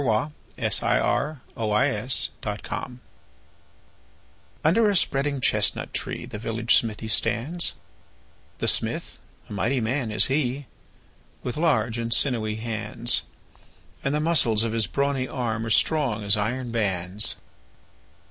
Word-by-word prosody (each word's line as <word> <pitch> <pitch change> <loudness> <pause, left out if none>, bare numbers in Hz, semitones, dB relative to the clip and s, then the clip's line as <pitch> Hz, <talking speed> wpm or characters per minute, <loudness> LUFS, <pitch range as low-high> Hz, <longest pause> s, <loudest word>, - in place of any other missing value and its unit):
The 125 +3 +1 0.3
Village 150 0 +1 1.0
Blacksmith 110 +4 -5 1.6
UNDER 210 +8 +4
a 200 - +1
spreading 140 -4 +1
chestnut - - +1
tree - - -3
The 105 - -7
village 115 +1 +1
smithy 110 -1 -1
stands; 120 +10 +2 0.8
The - - -2
smith, - - +1 0.3
a - - -8
mighty 115 +7 0
man 120 +1 -1
is 105 -2 +3
he, 135 0 0 0.8
With 125 - -3
large 120 -8 +1
and 115 0 -3
sinewy 115 -5 +1
hands; 115 +1 -1 0.8
And 140 +2 0
the - - +1
muscles 140 -9 +3
of 115 -1 -2
his 115 -4 +2
brawny 140 +5 0
arm 115 -3 -2
Are - - -3
strong 125 -4 +2
as 100 +1 +3
iron 120 +4 -2
bands. 100 -2 0
120 Hz, 120 wpm, -25 LUFS, 110-140 Hz, 1.6 s, UNDER